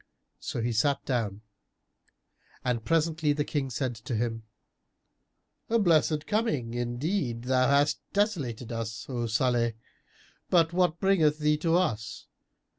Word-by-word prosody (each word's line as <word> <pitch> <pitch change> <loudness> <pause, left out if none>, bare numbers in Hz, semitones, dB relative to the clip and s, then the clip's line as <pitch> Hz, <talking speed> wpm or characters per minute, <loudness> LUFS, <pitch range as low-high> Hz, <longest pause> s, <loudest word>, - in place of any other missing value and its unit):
So 115 - -4
he 120 - 0
sat 140 +6 +1
down 110 -5 -2 1.2
and 120 -3 0
presently 160 0 +1
the 145 0 0
King 140 -3 -2
said 125 +1 -2
to 115 +2 -4
him, 115 0 -1 1.3
"A 230 - +3
blessed 160 -6 +3
coming: 180 - -1
indeed 120 - -2
thou 130 0 +2
hast 140 +1 +3
desolated 140 - -1
us, 110 -2 -4
O 120 -3 -2
Salih! 120 0 +1 0.8
But 170 -2 +3
what 175 -2 +2
bringeth 165 -7 +3
thee 150 0 +2
to 165 +2 +1
us? 110 - -2
135 Hz, 125 wpm, -28 LUFS, 115-160 Hz, 1.3 s, A